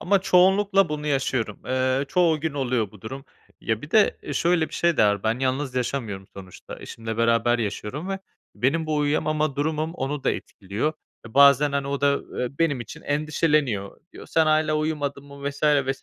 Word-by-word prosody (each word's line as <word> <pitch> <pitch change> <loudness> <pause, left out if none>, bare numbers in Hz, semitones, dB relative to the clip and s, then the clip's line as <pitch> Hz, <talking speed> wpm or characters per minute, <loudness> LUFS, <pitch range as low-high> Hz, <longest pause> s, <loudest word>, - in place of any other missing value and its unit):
ama 200 +2 +3
çoğunlukla 195 +1 +4
bunu 150 0 -4
yaşıyorum. 130 -6 -1
Eee, 130 +1 +1
çoğu 170 -5 +2
gün 160 -2 -2
oluyor 125 -7 -1
bu 105 - -16
durum. 135 +7 -7 0.4
Ya, 110 0 -2
bir 150 - -9
de, 215 -2 +4
eee, 145 - -6
şöyle 170 +1 +2
bir - - -10
şey 170 -1 +1
de - - +5
var: 105 -1 +1
Ben 110 +2 0
yalnız 130 0 -1
yaşamıyorum 115 -6 -3
sonuçta, 95 -2 -10
eşimle 110 -1 -6
beraber 115 +1 +2
yaşıyorum 115 - -4
ve 195 0 -2 0.4
benim 155 +6 0
bu 155 -1 0
uyuyamama 150 0 0
durumum 155 +2 -1
onu 140 -2 -4
da - - +3
etkiliyor 105 +10 -3 0.3
ve 110 - -14
bazen, 140 +1 +6
hani, 140 0 -1
o 140 -1 -2
da, 140 0 +4
ııı, 125 0 -5
benim 145 -6 +1
için - - -9
endişeleniyor. 145 -8 0
Diyor: - - -11
"Sen 160 -1 +2
hâlâ 155 0 +2
uyumadın 145 -2 -2
mı?" 140 0 -6
vs. 140 +1 -13
vs. 140 -3 +2
140 Hz, 185 wpm, -24 LUFS, 125-155 Hz, 0.4 s, bazen